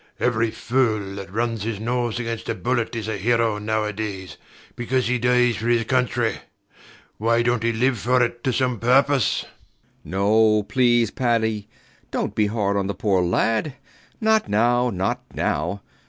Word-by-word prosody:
Every 115 -2 +1
fool 110 -5 -1
that 100 -1 -8
runs 115 +1 -1
his 110 -1 -3
nose 120 0 -1
against 115 -1 -4
a - - 0
bullet 120 -2 -1
is 110 -2 -4
a 110 -2 -2
hero 115 0 +1
nowadays, 105 -2 -3 0.4
because 125 +1 -1
he 125 +1 0
dies 125 -1 +3
for 115 - -4
his 120 -1 +3
country. 120 -1 0 0.8
Why 115 +2 +2
dont 120 -1 +1
he 115 0 +1
live 120 +1 +1
for 125 +3 +2
it 120 0 -3
to 130 - +2
some 125 -2 0
purpose? 135 +3 +3
B. - - -16 0.6
B. - - -13
No, 105 +2 +3
please, 120 -1 +2
Paddy: 110 -4 0 0.4
dont - - -2
be 105 -1 +1
hard 100 -2 0
on 100 -1 -1
the 100 - -3
poor 95 -1 +1
lad. 115 - 0 0.4
Not 220 -1 +2
now, 120 +4 +2
not 95 -2 -2
now. 90 +7 -2
115 Hz, 165 wpm, -22 LUFS, 105-120 Hz, 0.8 s, dies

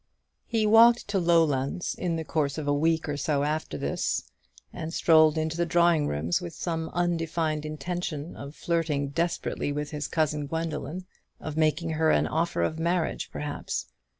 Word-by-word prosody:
He 225 -2 +1
walked 230 +2 +6
to 200 -1 +1
Lowlands 165 -3 +2
in 175 -2 -2
the 160 -1 -3
course 150 -3 -1
of 150 -2 -4
a 145 - +3
week 160 +2 +1
or 145 -1 -2
so 145 0 0
after 155 +2 -2
this, - - -1 0.5
and 165 -2 -5
strolled 155 -2 +5
into 160 0 -1
the 170 - +1
drawing 170 -2 +3
rooms 80 +4 0
with 85 - -7
some 165 -2 -3
undefined 165 -3 -1
intention 155 0 -4
of 140 +2 -9
flirting 155 -5 -1
desperately 165 -1 -1
with 150 0 -3
his 150 -1 -3
cousin 150 -2 0
Gwendoline; 165 +2 -4 0.3
of 155 - -6
making 160 +1 +1
her 160 0 +2
an - - +3
offer 160 - 0
of 155 - -1
marriage, 170 0 -1
perhaps. 150 -1 -4
160 Hz, 165 wpm, -27 LUFS, 150-170 Hz, 0.5 s, walked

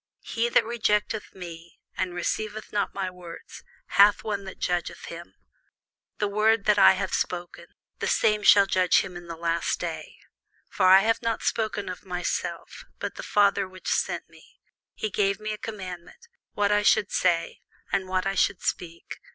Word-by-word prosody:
He 235 +1 -1
that - - +3
rejecteth 220 -2 -1
me, 170 -2 -10 0.2
and 180 -2 -2
receiveth 215 +4 -3
not 205 -1 -1
my 190 -2 -2
words, 175 -2 -11 0.2
hath 200 +2 +5
one 205 -2 -3
that 190 - -9
judgeth 175 -1 -2
him: 170 +1 -10 0.8
the 210 - 0
word 215 +1 +2
that 210 -1 +4
I - - +8
have 190 - -3
spoken, 175 -1 -3 0.3
the - - -2
same 210 0 +2
shall 200 -1 +7
judge 185 -2 +3
him 180 - -8
in 175 0 -9
the 170 - -6
last 165 0 -1
day. - - -5 0.6
For 185 - +2
I 190 +1 +8
have 225 +2 +1
not 230 -1 -2
spoken 215 -2 -1
of 185 -1 -6
myself; 180 -2 -4
but - - -4
the - - -8
Father 200 -2 +2
which 185 0 -7
sent - - -2
me, - - -20 0.4
he 215 - -3
gave 200 0 +1
me 215 0 -4
a - - -6
commandment, 195 - -8 0.3
what 205 0 +1
I 205 0 +3
should 205 -1 +3
say, 170 -2 0 0.3
and 195 -1 0
what 185 0 -1
I 195 - 0
should 185 -1 +1
speak. 170 -1 -4
195 Hz, 175 wpm, -26 LUFS, 180-210 Hz, 0.8 s, I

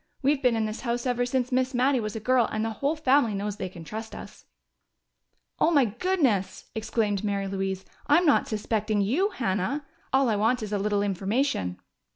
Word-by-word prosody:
We've 280 +1 +2
been 250 -3 +3
in 220 -1 0
this 215 +1 -4
house 240 0 -2
ever 245 -1 +1
since 255 0 -1
Miss 255 +1 +1
Mattie 260 +1 +3
was 215 -1 -4
a - - -2
girl, 245 +1 +2
and 215 0 -1
the 225 - -1
whole 280 +8 -1
family 270 -7 +3
knows 205 +1 -3
they 190 - -4
can 175 -2 -10
trust 220 +7 -7
us." - - -11 1.1
"Oh, - - +4
my 285 -6 +4
goodness!" 235 - 0
exclaimed 220 -2 -1
Mary 200 -1 -1
Louise. 190 -1 -3 0.2
"I'm 335 +5 +5
not 295 - +4
suspecting 215 -1 -1
you, 285 - +2
Hannah! 255 - -2 0.3
All 265 0 +3
I 215 -3 +1
want 225 +3 +1
is 210 -1 -5
a 205 - +1
little 205 0 +1
information." 195 - -1
225 Hz, 195 wpm, -27 LUFS, 205-260 Hz, 1.1 s, I'm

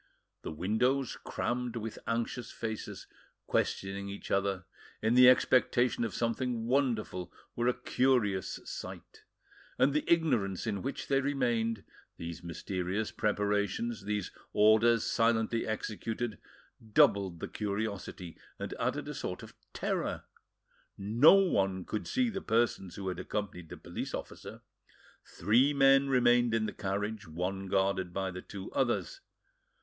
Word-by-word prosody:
The - - -5
windows, 115 - 0
crammed 125 0 -2
with 115 -1 -5
anxious 115 +1 -2
faces, 110 -2 -5 0.4
questioning 100 +1 -1
each 100 - -8
other, 100 -2 0 0.3
in 110 +2 +1
the 125 0 +9
expectation 125 -1 +3
of 115 - -3
something 115 0 -1
wonderful, 115 -9 0 0.2
were 120 +1 0
a 125 - +3
curious 120 -8 +1
sight; - - -8 0.6
and 135 +1 +4
the 150 - +1
ignorance 120 - +2
in 100 -4 -2
which 135 - -4
they 135 -1 +2
remained, 120 -6 0 0.3
these 85 -1 -6
mysterious 90 +4 -3
preparations, 105 +1 -1
these 105 -2 -2 0.2
orders 110 +2 +5
silently 115 0 +1
executed, 110 0 -3 0.5
doubled 100 - +4
the - - -4
curiosity, 100 -4 -4 0.2
and - - -5
added - - -1
a - - -4
sort - - -5
of - - -11 0.2
terror: - - -2 0.7
no 115 - +6
one 95 - +2
could 105 - -4
see 255 -1 +1
the 195 -4 -3
persons 110 - 0
who 100 -1 -5
had 90 - -3
accompanied 90 -5 -4
the - - -8
police - - -5
officer; - - -8 0.6
three 125 - +2
men 135 0 +5
remained 120 -2 +4
in 110 -1 +1
the - - -4
carriage, 105 +1 -3
one 90 +4 -3
guarded 95 -1 +1
by 95 +1 -2
the 90 +1 -7
two 95 0 -8
others. - - -1
110 Hz, 135 wpm, -31 LUFS, 95-120 Hz, 0.7 s, the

